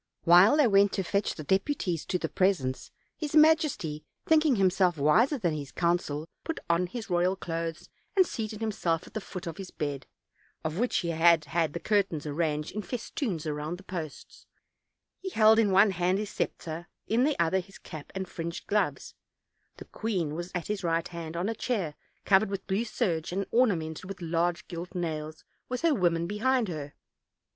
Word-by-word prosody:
While 180 Hz, -, +7 dB
they 300 Hz, -, +5 dB
went 200 Hz, -2 st, +4 dB
to 195 Hz, -, 0 dB
fetch 200 Hz, +3 st, 0 dB
the 155 Hz, -, -7 dB
deputies 190 Hz, -, 0 dB
to 180 Hz, -, 0 dB
the -, -, -2 dB
presence, 175 Hz, -10 st, 0 dB, 0.3 s
his 305 Hz, -2 st, -4 dB
majesty, 305 Hz, -, +3 dB, 0.2 s
thinking 310 Hz, -4 st, +4 dB
himself 185 Hz, -3 st, +3 dB
wiser 155 Hz, -, +4 dB
than 175 Hz, -9 st, 0 dB
his 145 Hz, -3 st, -5 dB
council, 170 Hz, -3 st, 0 dB, 0.2 s
put 325 Hz, -, -3 dB
on 170 Hz, +2 st, +2 dB
his 220 Hz, +2 st, -7 dB
royal 180 Hz, +2 st, +2 dB
clothes, 165 Hz, -2 st, -4 dB, 0.3 s
and 375 Hz, -2 st, +6 dB
seated 220 Hz, -7 st, -5 dB
himself 180 Hz, -6 st, -1 dB
at -, -, -15 dB
the 220 Hz, -, -3 dB
foot 190 Hz, -1 st, -7 dB
of 165 Hz, -1 st, -5 dB
his 195 Hz, -2 st, -7 dB
bed, 145 Hz, -3 st, -4 dB, 0.6 s
of 155 Hz, +3 st, -3 dB
which 245 Hz, +1 st, +1 dB
he 170 Hz, -, -1 dB
had 165 Hz, -1 st, +4 dB
had 160 Hz, 0 st, 0 dB
the 170 Hz, -, -3 dB
curtains 195 Hz, -7 st, 0 dB
arranged 150 Hz, 0 st, -1 dB
in 215 Hz, -, -4 dB
fes 235 Hz, +2 st, -6 dB
toons 190 Hz, -, -2 dB
around 150 Hz, +2 st, -3 dB
the 195 Hz, -, -14 dB
posts; 165 Hz, -6 st, -8 dB, 0.7 s
he 380 Hz, -, -5 dB
held 220 Hz, -7 st, +5 dB
in 215 Hz, -3 st, +4 dB
one 195 Hz, +2 st, +5 dB
hand 180 Hz, +1 st, +1 dB
his 210 Hz, 0 st, -4 dB
scepter, 165 Hz, +2 st, -4 dB, 0.2 s
in 230 Hz, +3 st, +2 dB
the 295 Hz, +1 st, +1 dB
other 170 Hz, +3 st, +3 dB
his 195 Hz, +2 st, -10 dB
cap 155 Hz, -5 st, -10 dB
and 190 Hz, -1 st, -3 dB
fringed 170 Hz, -1 st, -5 dB
gloves; 210 Hz, 0 st, -1 dB, 0.6 s
the -, -, -10 dB
queen 185 Hz, -9 st, -2 dB
was 175 Hz, +3 st, -5 dB
at 175 Hz, -, -2 dB
his 210 Hz, -2 st, -3 dB
right 165 Hz, -1 st, 0 dB
hand, 170 Hz, -1 st, -6 dB
on 180 Hz, +3 st, -1 dB
a 225 Hz, -, 0 dB
chair 205 Hz, -9 st, -2 dB, 0.3 s
covered 195 Hz, +1 st, +4 dB
with 195 Hz, -1 st, -4 dB
blue 200 Hz, +4 st, 0 dB
serge 175 Hz, -9 st, -1 dB
and 195 Hz, +2 st, -1 dB
ornamented 180 Hz, -9 st, +1 dB
with 195 Hz, 0 st, -7 dB
large 170 Hz, 0 st, -1 dB
gilt 175 Hz, +1 st, -7 dB
nails, 155 Hz, -3 st, -4 dB, 0.3 s
with 250 Hz, 0 st, -2 dB
her 335 Hz, -2 st, +4 dB
women 170 Hz, -7 st, +1 dB
behind 225 Hz, +4 st, +1 dB
her. 145 Hz, -4 st, -6 dB
180 Hz, 185 wpm, -28 LUFS, 165-210 Hz, 0.7 s, While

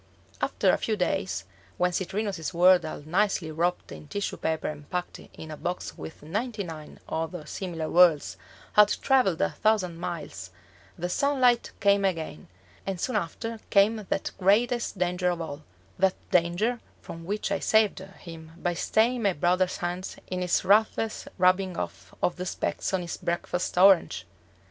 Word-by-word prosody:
After -, -, +2 dB
a -, -, +1 dB
few 220 Hz, -, 0 dB
days, 190 Hz, +1 st, -1 dB, 0.3 s
when 180 Hz, 0 st, +2 dB
Citrinus's 190 Hz, -2 st, -3 dB
world 180 Hz, +1 st, +6 dB
all 155 Hz, -, -6 dB
nicely 180 Hz, -1 st, +1 dB
wrapped 175 Hz, +3 st, -1 dB
in 150 Hz, -, -10 dB
tissue 205 Hz, +6 st, -3 dB
paper 160 Hz, -1 st, -1 dB
and 150 Hz, -1 st, -7 dB
packed 180 Hz, 0 st, -4 dB
in 160 Hz, -, -11 dB
a -, -, -5 dB
box 155 Hz, -, -4 dB
with 80 Hz, -, -9 dB
ninety 210 Hz, +6 st, -3 dB
nine 160 Hz, -4 st, -9 dB
other 160 Hz, 0 st, -4 dB
similar 165 Hz, -1 st, -4 dB
worlds 170 Hz, -4 st, +4 dB, 0.4 s
had 210 Hz, 0 st, +7 dB, 0.2 s
traveled 255 Hz, -, +3 dB
a -, -, +2 dB
thousand 185 Hz, -6 st, +1 dB
miles, 170 Hz, -, -5 dB, 0.5 s
the 175 Hz, -, -2 dB
sunlight 250 Hz, +2 st, +2 dB
came 200 Hz, 0 st, +4 dB
again, 160 Hz, -, -2 dB, 0.4 s
and 195 Hz, -2 st, -4 dB
soon 250 Hz, +6 st, -2 dB
after 220 Hz, +4 st, -3 dB
came 205 Hz, +3 st, +4 dB
that -, -, -1 dB
greatest 225 Hz, +4 st, +2 dB
danger 180 Hz, 0 st, +1 dB
of 175 Hz, -1 st, -2 dB
all 155 Hz, -3 st, -6 dB, 0.4 s
that 190 Hz, 0 st, +3 dB, 0.2 s
danger 180 Hz, +8 st, +2 dB, 0.2 s
from 165 Hz, 0 st, -8 dB
which 200 Hz, +3 st, -3 dB
I 195 Hz, -, +1 dB
saved 220 Hz, -3 st, +3 dB
him 165 Hz, -4 st, -11 dB
by 175 Hz, 0 st, -1 dB
staying 230 Hz, +7 st, +1 dB
my 200 Hz, -3 st, +2 dB
brother's 180 Hz, +3 st, +1 dB
hand 180 Hz, +1 st, -4 dB
in 185 Hz, 0 st, -4 dB
its 180 Hz, -1 st, +1 dB
ruthless 215 Hz, +2 st, +2 dB
rubbing 185 Hz, -1 st, +3 dB
off -, -, -6 dB
of 180 Hz, -, +1 dB
the 180 Hz, +1 st, -4 dB
specks -, -, -2 dB
on 190 Hz, -1 st, 0 dB
his 170 Hz, -, -5 dB
breakfast 175 Hz, 0 st, -2 dB
orange! 180 Hz, -, +5 dB
180 Hz, 160 wpm, -27 LUFS, 170-200 Hz, 0.5 s, had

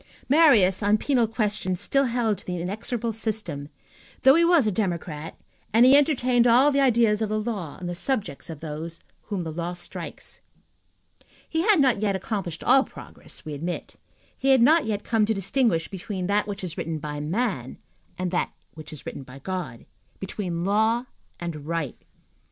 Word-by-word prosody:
Marius, 245 Hz, -, +5 dB
on 205 Hz, +1 st, +3 dB
penal 245 Hz, -1 st, +1 dB
questions, 210 Hz, -5 st, -1 dB
still 275 Hz, +7 st, +2 dB
held 230 Hz, -5 st, 0 dB
to -, -, -10 dB
the 180 Hz, -1 st, -3 dB
inexorable 220 Hz, +5 st, -3 dB
system, 210 Hz, -10 st, -2 dB, 0.5 s
though 265 Hz, -, +8 dB
he 335 Hz, +3 st, +4 dB
was 335 Hz, -6 st, +5 dB
a 215 Hz, -, +2 dB
democrat 170 Hz, -6 st, -3 dB, 0.3 s
and 230 Hz, +4 st, +6 dB
he 260 Hz, +2 st, +7 dB
entertained 255 Hz, -4 st, +3 dB
all 255 Hz, +5 st, +5 dB
the 280 Hz, -, +1 dB
ideas 230 Hz, -5 st, +3 dB
of 220 Hz, -, 0 dB
the 215 Hz, 0 st, 0 dB
law 210 Hz, -9 st, -4 dB
on 180 Hz, -, -7 dB
the 175 Hz, -, -3 dB
subject 195 Hz, -, -2 dB
of 160 Hz, -3 st, -8 dB
those 160 Hz, +2 st, -6 dB, 0.3 s
whom 200 Hz, -4 st, -3 dB
the 160 Hz, -, -5 dB
law 170 Hz, +2 st, -3 dB
strikes. 175 Hz, 0 st, -8 dB, 1.1 s
He 320 Hz, -, 0 dB
had 405 Hz, -1 st, +4 dB
not 255 Hz, -7 st, +3 dB
yet 200 Hz, -2 st, +1 dB
accomplished 190 Hz, -4 st, -4 dB
all 270 Hz, -, +5 dB
progress, -, -, -12 dB
we 155 Hz, -, -5 dB
admit. 170 Hz, +5 st, -5 dB, 0.4 s
He 270 Hz, -, -1 dB
had 265 Hz, -2 st, +6 dB
not 315 Hz, +4 st, +5 dB
yet 210 Hz, -2 st, -2 dB
come 220 Hz, -2 st, +1 dB
to 220 Hz, -, +1 dB
distinguish 195 Hz, -3 st, +1 dB
between 190 Hz, -1 st, -5 dB
that 205 Hz, +2 st, +1 dB
which 200 Hz, -2 st, -5 dB
is 170 Hz, -3 st, -5 dB
written 165 Hz, -1 st, -3 dB
by 150 Hz, -1 st, -5 dB
man 160 Hz, -, -2 dB, 0.4 s
and 180 Hz, -1 st, -2 dB
that 180 Hz, -, 0 dB, 0.2 s
which 155 Hz, -1 st, -10 dB
is 155 Hz, -, -10 dB
written -, -, -6 dB
by 130 Hz, 0 st, -12 dB
God, 175 Hz, -5 st, -5 dB, 0.3 s
between 180 Hz, -3 st, -4 dB
law 220 Hz, +4 st, +2 dB, 0.3 s
and 155 Hz, -4 st, -6 dB
right. 165 Hz, -5 st, -3 dB
205 Hz, 180 wpm, -25 LUFS, 170-235 Hz, 1.1 s, though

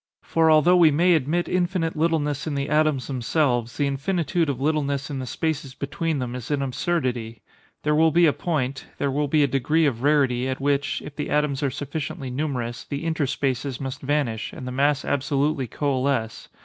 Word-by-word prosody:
For 165 Hz, -1 st, +2 dB
although 160 Hz, +3 st, +5 dB
we 170 Hz, -3 st, +7 dB
may 170 Hz, +5 st, +4 dB
admit 160 Hz, +3 st, +1 dB
infinite 175 Hz, -2 st, 0 dB
littleness 155 Hz, -2 st, 0 dB
in 150 Hz, -, -2 dB
the 140 Hz, +1 st, -2 dB
atoms 150 Hz, -3 st, +2 dB
themselves, 125 Hz, -2 st, 0 dB
the 145 Hz, -, +1 dB
infinitude 160 Hz, +3 st, 0 dB
of 135 Hz, -3 st, -2 dB
littleness 140 Hz, -1 st, -1 dB
in 135 Hz, -, -3 dB
the 130 Hz, -, -5 dB
spaces 150 Hz, -4 st, -3 dB
between 160 Hz, +2 st, -2 dB
them 125 Hz, -2 st, -3 dB
is 125 Hz, -1 st, -6 dB
an 145 Hz, -2 st, 0 dB
absurdity. 125 Hz, -6 st, -2 dB, 0.4 s
There 150 Hz, -, +2 dB
will 160 Hz, +2 st, +5 dB
be 170 Hz, +2 st, +4 dB
a 150 Hz, -, +4 dB
point—there 140 Hz, -3 st, -2 dB
will 145 Hz, +2 st, 0 dB
be 150 Hz, +1 st, +3 dB
a -, -, +3 dB
degree 150 Hz, +5 st, +2 dB
of 120 Hz, -5 st, 0 dB
rarity, 135 Hz, -3 st, +2 dB
at 130 Hz, -, -3 dB
which, 145 Hz, +1 st, 0 dB
if 145 Hz, -, -9 dB
the 150 Hz, -, -4 dB
atoms 150 Hz, -1 st, +1 dB
are 140 Hz, -, +1 dB
sufficiently 140 Hz, -1 st, -5 dB
numerous, 125 Hz, -4 st, -3 dB
the 140 Hz, +1 st, -5 dB
interspaces 140 Hz, -4 st, -1 dB
must 135 Hz, -1 st, -5 dB
vanish, 135 Hz, -6 st, -1 dB
and 125 Hz, -, -7 dB
the -, -, -4 dB
mass 140 Hz, +2 st, +1 dB
absolutely 140 Hz, 0 st, 0 dB
coalesce. 130 Hz, -3 st, -1 dB
145 Hz, 185 wpm, -24 LUFS, 130-155 Hz, 0.4 s, we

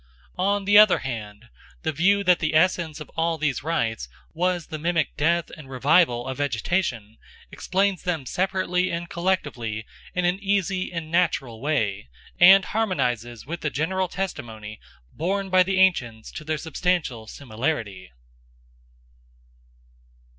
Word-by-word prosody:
On 200 Hz, +1 st, +1 dB
the 205 Hz, +1 st, +7 dB
other 215 Hz, -3 st, +7 dB
hand, 115 Hz, -3 st, -7 dB, 0.3 s
the 160 Hz, -, 0 dB
view 195 Hz, +7 st, +2 dB
that 180 Hz, -2 st, +4 dB
the 155 Hz, -1 st, -1 dB
essence 165 Hz, -2 st, +2 dB
of 150 Hz, -, -10 dB
all 165 Hz, 0 st, 0 dB
these 145 Hz, -4 st, -1 dB
rites 115 Hz, -, -2 dB, 0.2 s
was 175 Hz, 0 st, 0 dB
the 155 Hz, -, -7 dB
mimic 170 Hz, +1 st, 0 dB
death 170 Hz, +2 st, +1 dB
and 150 Hz, -4 st, -13 dB
revival 135 Hz, -1 st, +3 dB
of 130 Hz, +1 st, -5 dB
vegetation, 120 Hz, -, -1 dB, 0.3 s
explains 195 Hz, 0 st, 0 dB
them 165 Hz, -6 st, -2 dB
separately 185 Hz, +2 st, 0 dB
and 170 Hz, +1 st, -4 dB
collectively 140 Hz, -, -2 dB, 0.3 s
in 180 Hz, -1 st, +1 dB
an 180 Hz, +2 st, +1 dB
easy 195 Hz, -2 st, 0 dB
and 165 Hz, -2 st, -5 dB
natural 150 Hz, -10 st, 0 dB
way, 105 Hz, -, -1 dB, 0.3 s
and 190 Hz, +2 st, +8 dB
harmonises 120 Hz, -, -2 dB
with 170 Hz, +5 st, -6 dB
the 150 Hz, -, -1 dB
general 185 Hz, +6 st, -1 dB
testimony 110 Hz, -, -6 dB, 0.3 s
borne 195 Hz, +4 st, -2 dB
by 185 Hz, 0 st, +6 dB
the 190 Hz, +1 st, +1 dB
ancients 120 Hz, -13 st, +1 dB
to 155 Hz, -, -8 dB
their 155 Hz, 0 st, -2 dB
substantial 155 Hz, -7 st, -2 dB
similarity. 110 Hz, -6 st, -4 dB
160 Hz, 135 wpm, -24 LUFS, 125-185 Hz, 0.3 s, and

